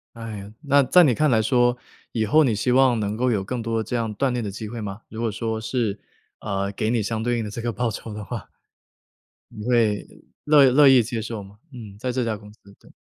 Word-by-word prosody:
哎 115 -3 -7
哟， 100 +2 -11
那 140 0 +4
在 180 +7 +6
你 125 - +3
看 150 +2 +2
来 110 -1 +4
说， 120 +1 +2 0.3
以 110 -2 0
后 155 +9 +4
你 120 -5 +2
希 125 +4 0
望 130 -3 +4
能 105 0 -2
够 125 +1 +1
有 105 -3 0
更 125 +1 -3
多 115 0 -1
这 115 +3 -4
样 115 -2 -2
锻 135 +5 0
炼 120 -2 -2
的 100 - -4
机 110 +2 -7
会 115 0 -6
吗？ 100 +2 -6
如 110 +1 -7
果 115 -2 0
说 110 +1 -3
是， 110 -3 -2 0.4
呃， 100 -1 -2
给 110 +2 -1
你 115 -2 +1
相 110 +2 -2
对 120 0 0
应 110 - -2
的 - - -5
这 115 +3 -6
个 120 0 -2
报 120 +2 -1
酬 110 0 -7
的 105 - -6
话。 115 +1 -7 1.0
你 105 +1 -8
会 115 -4 +1 0.4
乐 145 -4 +6
乐 145 +2 +6
意 130 -3 +6
接 115 0 -4
受 110 -2 -6
吗？ 100 +2 -15 0.2
嗯， 105 -5 -10
在 125 +1 -2
这 125 0 -1
家 110 -2 -2
公 105 0 -14
司， - - -27 0.2
对。 - - -19
115 Hz, 265 characters per minute, -23 LUFS, 105-125 Hz, 1.0 s, 在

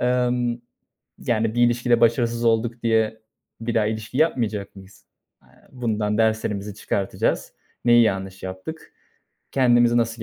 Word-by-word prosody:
emm, 125 -1 +1 0.6
yani 115 -1 0
bir 120 - +2
ilişkide 120 0 +3
başarısız 115 0 +2
olduk 115 +1 +1
diye 110 -1 +1 0.4
bir 115 +1 -3
daha 110 -2 +2
ilişki 110 +3 -4
yapmayacak 110 -11 0
mıyız? 95 0 -15 0.4
Aaa, - - -28 0.3
bundan 110 -4 -1
derslerimizi 105 -2 0
çıkartacağız. 100 -1 -2 0.3
Neyi 120 0 +6
yanlış 95 -3 -2
yaptık. 95 +13 -8 0.6
Kendimizi 120 -2 +4
nasıl 115 -1 0
115 Hz, 125 wpm, -23 LUFS, 105-120 Hz, 0.6 s, Neyi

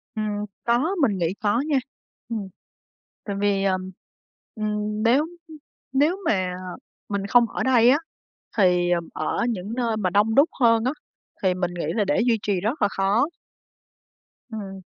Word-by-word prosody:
Ừm. 210 -1 -2 0.2
Có, 255 +11 +1
mình 220 -8 +2
nghĩ 170 0 0
có 215 +3 +1
nha. 295 -3 +2 0.5
Ừm. 220 -4 -3 0.8
Tại 200 - -3
vì, 200 -1 +1
ờm, 185 -1 -1 0.6
ừm, 210 0 -2
nếu, 235 +4 +5 0.3
ưm, 315 -1 -11 0.4
nếu 300 +7 +3
mà 185 -3 +1 0.6
mình 200 -1 -2
không 235 +2 +4
ở - - -3
đây 245 -2 +5
á 270 - +6 0.6
thì, 180 -3 +4
ừm, 170 -2 0
ở 155 - -1
những 210 0 -4
nơi 235 -3 0
mà 190 -4 0
đông 205 +4 +2
đúc 280 +6 +6
hơn 230 -2 +4
á, 255 - +1 0.5
thì 185 -1 +2
mình 180 -1 -1
nghĩ 170 -3 -3
là 210 - +2
để 195 +3 +1
duy 230 -2 +3
trì 200 -3 0
rất 225 - -2
là 205 - +4
khó. 195 +7 +2 1.3
Ừm. 195 -3 -7
210 Hz, 165 wpm, -24 LUFS, 195-235 Hz, 1.3 s, á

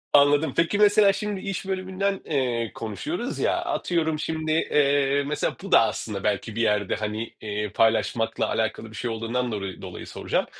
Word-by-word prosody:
Anladım. 145 +2 +5
Peki, 165 +5 +2
mesela 205 -1 +6
şimdi 205 -1 -3
iş 195 -1 -4
bölümünden, 190 +1 -1
eee, 125 -6 -1
konuşuyoruz 110 -5 -4
ya, - - +2
atıyorum 160 -3 -1
şimdi, 160 0 -2
eee, 140 -2 +2
mesela 150 - -1
bu - - -7
da - - +5 0.3
belki 105 +1 -1
bir 115 - 0
yerde, 105 -3 +1
hani, 110 +1 -4
eee, 105 0 -3
paylaşmakla 115 0 +1
alakalı 110 0 -2
bir 110 - -11
şey 120 +3 -3
olduğundan 115 +2 -2
dolayı 100 -3 -5
dolayı - - -8
soracağım. - - -1
135 Hz, 160 wpm, -25 LUFS, 110-165 Hz, 0.3 s, mesela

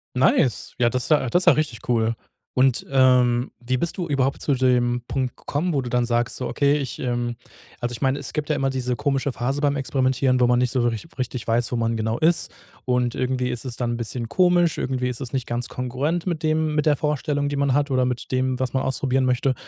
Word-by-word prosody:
Nice. 130 0 +2
Ja, 120 -1 +4
das 125 -1 -2
ja 145 -5 +3
das 175 +8 +2
ist - - -1
ja - - +9
richtig 150 -7 -1
cool. 115 -1 +1 0.4
Und, 130 -1 +3
ähm, 125 -2 +3
wie 125 +1 -1
bist 170 +6 -2
du 175 -2 -2
überhaupt 135 -1 0
zu 145 - +1
dem 125 -1 +2
Punkt 130 -2 -2
gekommen, 170 +5 -2
wo 140 - +1
du 125 - -5
dann 125 0 +1
sagst, 120 0 0
so: 125 - -3
„Okay, 145 0 +2
ich, 135 -4 -4
ähm“ 120 -1 -2 0.4
also, 120 -1 -3
ich - - -8
meine, 135 0 +2
es 140 - -7
gibt 150 0 -3
ja 150 - +2
immer 135 -1 0
diese 125 -1 -2
komische 135 +1 0
Phase 135 +5 -2
beim 145 -1 +2
Experimentieren, 130 -1 +1
wo 125 - +5
man 120 0 +3
nicht 125 -1 +1
so 130 -3 +1
wirklich 120 +5 -1
richtig 125 -2 -3
weiß, 120 +2 +1
wo - - -1
man 115 0 0
genau 110 +1 -1
ist. 165 +2 +2 0.3
Und 125 -2 +1
irgendwie 125 -1 -1
ist 125 +1 -4
es 125 -2 -5
dann 120 -1 -1
'n 120 - -2
bisschen 115 0 -4
komisch, 175 -1 +3
irgendwie 125 -1 -1
ist 120 - -5
es 125 - -5
nicht 130 -2 -2
ganz 120 0 -3
kongruent 135 +7 -2
mit 170 -4 -2
dem 155 0 +1
mit 150 0 +1
der 145 -3 +4
Vorstellung, 145 -1 -1
die 145 - -3
man 140 -2 +1
hat 145 0 +1
oder 130 -1 +2
mit 125 0 -4
dem, 130 0 0
was 130 -1 -2
man 130 - 0
ausprobieren 130 0 0
möchte. 130 +1 +1
130 Hz, 240 wpm, -23 LUFS, 120-140 Hz, 0.4 s, ja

